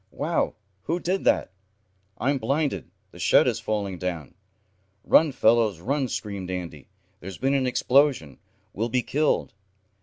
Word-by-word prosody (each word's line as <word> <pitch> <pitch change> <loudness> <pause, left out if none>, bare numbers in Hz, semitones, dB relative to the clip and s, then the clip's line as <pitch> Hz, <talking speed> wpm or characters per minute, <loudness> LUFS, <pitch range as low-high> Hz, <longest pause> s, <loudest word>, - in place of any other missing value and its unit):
"Wow! - - -1 0.3
Who 170 +3 -1
did 185 +2 -2
that!" - - +2 0.7
"I'm 135 +2 0
blinded! 140 +6 -1 0.2
The - - -14
shed - - +4
is - - 0
falling 100 -4 -3
down!" 85 -7 -4 0.7
"Run 160 -2 +5
fellows, 110 -6 +2
run!" 135 - -1
screamed 100 -6 -5
Andy. 85 -6 -6 0.3
"There's 95 +2 -8
been 135 +1 0
an 135 -2 +1
explosion. 125 - +2 0.3
We'll 115 +4 -2
be 125 +1 0
killed!" 150 +2 0
115 Hz, 140 wpm, -25 LUFS, 95-140 Hz, 0.7 s, Run